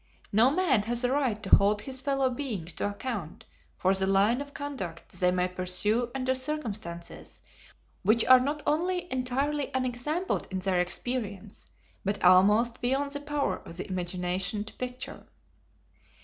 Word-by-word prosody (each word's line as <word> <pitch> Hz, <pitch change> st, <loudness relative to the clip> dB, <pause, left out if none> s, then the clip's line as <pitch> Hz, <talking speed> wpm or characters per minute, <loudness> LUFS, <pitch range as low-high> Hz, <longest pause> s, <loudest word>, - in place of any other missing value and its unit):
No 225 Hz, +5 st, +5 dB
man 295 Hz, -, +2 dB
has 240 Hz, +1 st, +1 dB
a 245 Hz, -, +2 dB
right 260 Hz, -7 st, 0 dB
to 190 Hz, -, +7 dB
hold 205 Hz, +1 st, +1 dB
his 260 Hz, 0 st, -3 dB
fellow 270 Hz, -1 st, +1 dB
beings 220 Hz, -, -4 dB
to -, -, -2 dB
account 205 Hz, -5 st, -5 dB, 0.3 s
for 190 Hz, +1 st, +2 dB
the 190 Hz, 0 st, +1 dB
line 200 Hz, +6 st, +3 dB
of 285 Hz, 0 st, -8 dB
conduct 260 Hz, -14 st, -6 dB
they 180 Hz, -1 st, +4 dB
may 180 Hz, 0 st, +1 dB
pursue 185 Hz, +6 st, 0 dB
under 260 Hz, -1 st, +1 dB
circumstances 200 Hz, -, -5 dB, 0.6 s
which 220 Hz, +4 st, +4 dB
are 255 Hz, +1 st, +8 dB
not 290 Hz, +4 st, -2 dB
only 355 Hz, +2 st, 0 dB
entirely 270 Hz, +3 st, -1 dB
unexampled 260 Hz, +8 st, -1 dB
in 190 Hz, -, -3 dB
their 185 Hz, -1 st, 0 dB
experience, 200 Hz, +2 st, -4 dB, 0.4 s
but 200 Hz, +1 st, -2 dB
almost 205 Hz, +6 st, +5 dB
beyond 270 Hz, +3 st, 0 dB
the 285 Hz, 0 st, -5 dB
power 290 Hz, -10 st, -1 dB
of 165 Hz, -, -9 dB
the 185 Hz, -, -5 dB
imagination 180 Hz, +2 st, -2 dB
to 215 Hz, -, -11 dB
picture. 250 Hz, 0 st, -6 dB
230 Hz, 150 wpm, -28 LUFS, 190-270 Hz, 0.6 s, are